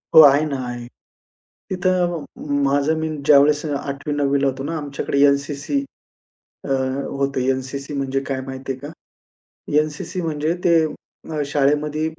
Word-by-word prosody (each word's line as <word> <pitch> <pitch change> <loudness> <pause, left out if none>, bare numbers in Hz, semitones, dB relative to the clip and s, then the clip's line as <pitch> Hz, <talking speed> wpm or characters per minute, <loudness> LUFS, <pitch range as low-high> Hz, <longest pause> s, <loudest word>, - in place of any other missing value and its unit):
हो, 160 - +12
आहे 145 0 +7
ना 145 -3 -2
आहे. 120 0 -6 0.8
तिथं 180 -1 +1
अ, 160 - -6 0.4
माझं 140 +3 +2
मी 160 - -1 0.2
ज्यावेळेस 145 +1 +5
8वी-9वी 140 0 -1
ला - - +3
होतो 135 0 -1
ना. 165 +3 -3
आमच्याकडे 140 -2 -2
एन-सी-सी, 140 - 0 0.9
अ, - - -6 0.5
होतं 140 -1 0
एन-सी-सी 130 +2 -2
म्हणजे 135 -1 -1
काय 130 - -1
माहिती 135 0 -5
आहे 130 - -9
का? 145 - -7 0.9
एन-सी-सी 155 +4 -4
म्हणजे 155 0 -1
ते 170 -1 +5 0.6
अ, - - -1
शाळेमध्ये 150 +2 +1
145 Hz, 140 wpm, -21 LUFS, 140-155 Hz, 0.9 s, हो